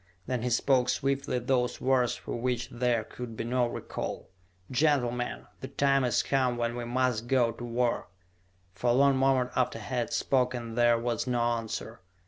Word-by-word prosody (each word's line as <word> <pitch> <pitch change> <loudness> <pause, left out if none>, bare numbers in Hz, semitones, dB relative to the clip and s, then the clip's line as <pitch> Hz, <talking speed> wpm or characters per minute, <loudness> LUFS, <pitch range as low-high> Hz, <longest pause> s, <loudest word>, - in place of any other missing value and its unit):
Then 125 -2 -2
he 125 - -1
spoke 125 +1 +2
swiftly 135 0 0
those 125 0 0
words 125 -2 +2
for - - -6
which 120 0 -2
there 120 -2 0
could 115 0 -8
be - - -2
no 125 +1 +1
recall: 120 - -5 0.4
"Gentlemen, 125 -3 +1
the 130 - -6
time 135 0 +2
is 125 - +2
come 130 -3 +1
when 120 0 -1
we 120 -1 -4
must 120 -2 0
go 120 -2 +3
to 115 - -9
war!" 120 0 0 0.7
For 120 +5 -1
a - - +5
long 140 +2 +4
moment 130 -1 +2
after 125 -3 +1
he 110 - -9
had 125 -3 -2
spoken 125 -3 0
there 120 0 +4
was 120 0 -2
no 125 -1 +1
answer. 115 -1 -2
125 Hz, 175 wpm, -29 LUFS, 120-130 Hz, 0.7 s, a